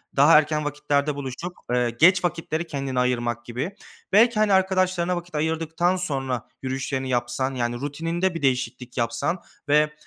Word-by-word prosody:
daha 145 +4 +7
erken 150 0 +1
vakitlerde 150 0 0
buluştuk." 140 +6 -6
Eee, 125 -1 +2
geç 175 +10 +4
vakitleri 165 -1 -2
kendine 135 -4 -2
ayırmak 120 -1 0
gibi 130 - -4 0.4
belki, 225 +2 +5
hani, 215 -2 +3
arkadaşlarına 185 -2 +2
vakit 175 -1 -7
ayırdıktan 160 +3 0
sonra 135 -9 -2
yürüyüşlerini 130 0 -3
yapsan, 125 +2 -1
yani 120 -1 -1
rutininde 165 +7 -2
bir 165 - -4
değişiklik 130 -2 -1
yapsan 120 +9 -1 0.3
ve 150 +1 +4
150 Hz, 145 wpm, -24 LUFS, 130-175 Hz, 0.4 s, daha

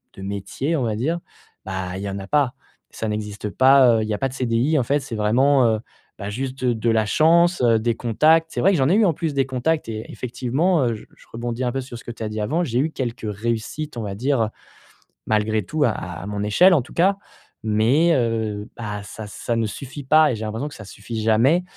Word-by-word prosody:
de - - -10
métier, 100 - -3
on 140 - 0
va 110 -2 -1
dire, 155 +10 -1 0.5
bah, 95 -1 -4
il 95 - -6
y 100 - -3
en 100 0 -4
a 95 - -8
pas, 140 0 +2 0.4
ça 110 - -4
n'existe 105 0 -4
pas, 130 -1 +5
heu, - - 0
il - - -4
y - - 0
a - - -7
pas 135 - 0
de - - -11
CDI, 125 +4 +1
en - - +1
fait. 140 +5 +1
C'est 135 -4 -6
vraiment, 125 +6 +3
heu, 110 -1 +1 0.4
bah, 100 -1 -4
juste 130 +4 -5
de 125 -1 +3
de 115 +1 -1
la 110 -1 +2
chance, 170 +5 +4
heu, 115 -2 +4
des 115 +1 0
contacts, 155 +8 +3
c'est - - -4
vrai 195 - +5
que - - +2
j'en 135 -1 +2
ai - - +4
eu 220 0 +4
en 175 - +3
plus 160 -1 -2
des 135 -1 +2
contacts 135 +3 -1
et 110 0 -5
effectivement, 130 +7 0
heu, 120 - +1
je 105 - -11
je - - -19
rebondis 120 +2 -4
un 125 - 0
peu 135 - -1
sur 125 -2 -9
ce - - -13
que - - -5
tu 115 - -12
as 110 - -2
dit 110 0 -4
avant. 155 +12 0
J'ai 120 -7 -2
eu 155 +4 0
quelques 120 -5 -4
réussites, 115 +7 -3
on 115 - -3
va 100 -2 -4
dire, 120 -1 +1 0.8
malgré 110 0 +1
tout 155 +9 -1
à 115 - +3
à 90 -2 -6
mon 105 0 -3
échelle 175 - +5
en 145 - +3
tout - - -15
cas, 190 +3 +3 0.5
mais 115 +10 +3
heu, 110 -4 -1
bah, 105 -3 -5
ça 105 +1 -8
ça 115 +3 -3
ne 115 -1 0
suffit 135 +6 -8
pas 155 +2 +5
et - - -2
j'ai 110 0 -5
l'impression 110 +7 -3
que - - -12
ça 105 - -10
suffit 105 +3 -6
jamais, 115 +11 +3
120 Hz, 250 wpm, -22 LUFS, 110-140 Hz, 0.8 s, pas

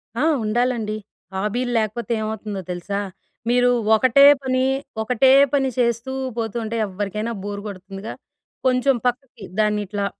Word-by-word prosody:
ఆ! 240 - -1 0.2
ఉండాలండి. 220 -1 0 0.4
హాబీలు 225 +6 -1
లేకపోతే 220 +1 -3
ఏమవుతుందో 215 -2 -4
తెలుసా. 180 +3 -3 0.5
మీరు 245 0 +4 0.3
ఒకటే 255 +4 +5 0.2
పని 255 0 +1 0.4
ఒకటే 250 +3 +3 0.2
పని 275 -2 +2
చేస్తూ 235 +1 0 0.3
పోతూ 225 -2 -3
ఉంటే 225 +1 -3
ఎవ్వరికైనా 205 +3 -3
బోర్ 205 0 -5
కొడుతుందిగా. 195 +2 -8 0.5
కొంచెం 255 +1 +3
పక్కకి 245 -3 -4 0.2
దాన్ని 210 -1 +2
ఇట్లా 200 +1 -2
220 Hz, 125 wpm, -22 LUFS, 205-245 Hz, 0.5 s, ఒకటే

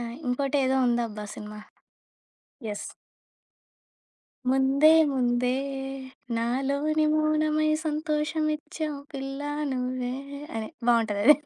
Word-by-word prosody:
ఆహ్, 235 0 -5
ఇంకోటేదో 270 +1 +1
ఉందబ్బా 230 -3 -1
cinema. 210 0 -8 1.1
Yes. 205 - -4 1.6
ముందే 270 +4 +5 0.2
ముందే 250 -1 +1 0.8
నాలోని 280 +6 +1
మౌనమై 310 0 +2 0.2
సంతోషమిచ్చావు 305 0 -1
పిల్ల 270 0 -5 0.3
నువ్వే 250 -1 -2 0.4
అని 220 -1 -3 0.2
బావుంటదది. 230 +3 +5
270 Hz, 75 wpm, -27 LUFS, 240-305 Hz, 1.6 s, ముందే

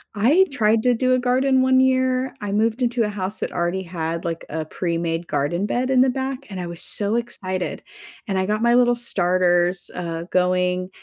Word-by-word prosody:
I 280 - +4
tried 220 -4 +2
to 250 - +3
do 255 +2 +1
a 255 - +2
garden 260 +1 +2
one 260 0 +4
year, 260 0 +1
I 205 -1 -4
moved 225 +4 0
into 240 -1 +1
a 210 - -1
house 205 0 -4
that - - -4
already 175 +2 -1
had 165 -1 -4
like 165 -1 -3
a 155 +1 -3
pre-made 170 0 -2
garden 150 +7 -1
bed 250 +4 -1
in 260 -1 +4
the 260 - +4
back 265 0 -3
and 190 -2 -6
I 175 - -4
was 170 0 -2
so 205 +1 0
excited, 190 -6 -3 0.5
and 195 -2 -1
I 190 - +1
got 210 +2 -1
my 235 0 +3
little 245 0 +4
starters, 180 -5 +1
uh, 170 -2 -4
going 180 0 0
205 Hz, 200 wpm, -22 LUFS, 175-250 Hz, 0.5 s, I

